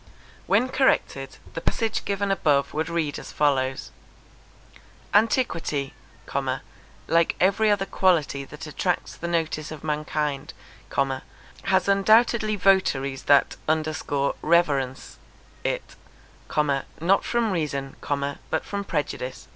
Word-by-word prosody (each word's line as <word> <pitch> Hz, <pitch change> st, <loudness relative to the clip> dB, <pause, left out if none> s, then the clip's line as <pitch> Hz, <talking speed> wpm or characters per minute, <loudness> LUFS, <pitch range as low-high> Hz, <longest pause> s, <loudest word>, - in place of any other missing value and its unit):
When 255 Hz, -, +3 dB
corrected, 265 Hz, 0 st, +1 dB, 0.2 s
the -, -, -4 dB
passage 225 Hz, -2 st, -1 dB
given 200 Hz, 0 st, 0 dB
above 145 Hz, -7 st, +2 dB
would 160 Hz, +1 st, -1 dB
read 160 Hz, -4 st, -1 dB
as -, -, -9 dB
follows 135 Hz, -3 st, 0 dB, 1.2 s
ANTIQUITY, 200 Hz, -, +1 dB, 1.1 s
like 170 Hz, 0 st, +3 dB
every 200 Hz, +4 st, +3 dB
other 205 Hz, -2 st, +2 dB
quality 160 Hz, -9 st, +2 dB
that 150 Hz, +3 st, -9 dB
attracts 175 Hz, +4 st, -2 dB
the 170 Hz, -, -5 dB
notice 160 Hz, -3 st, -1 dB
of 155 Hz, -2 st, -8 dB
mankind, 150 Hz, -2 st, -2 dB, 1.1 s
has 190 Hz, -1 st, +2 dB
undoubtedly 215 Hz, +2 st, +4 dB
votaries 140 Hz, -9 st, +2 dB
that 140 Hz, -1 st, +4 dB, 0.8 s
reverence 140 Hz, -6 st, +1 dB, 0.4 s
it, -, -, -3 dB, 1.0 s
not 185 Hz, +5 st, +3 dB
from 235 Hz, -3 st, 0 dB
reason, 140 Hz, -6 st, -2 dB, 0.5 s
but -, -, -1 dB
from 200 Hz, 0 st, -3 dB
prejudice. 145 Hz, -7 st, -3 dB
165 Hz, 100 wpm, -25 LUFS, 145-200 Hz, 1.2 s, undoubtedly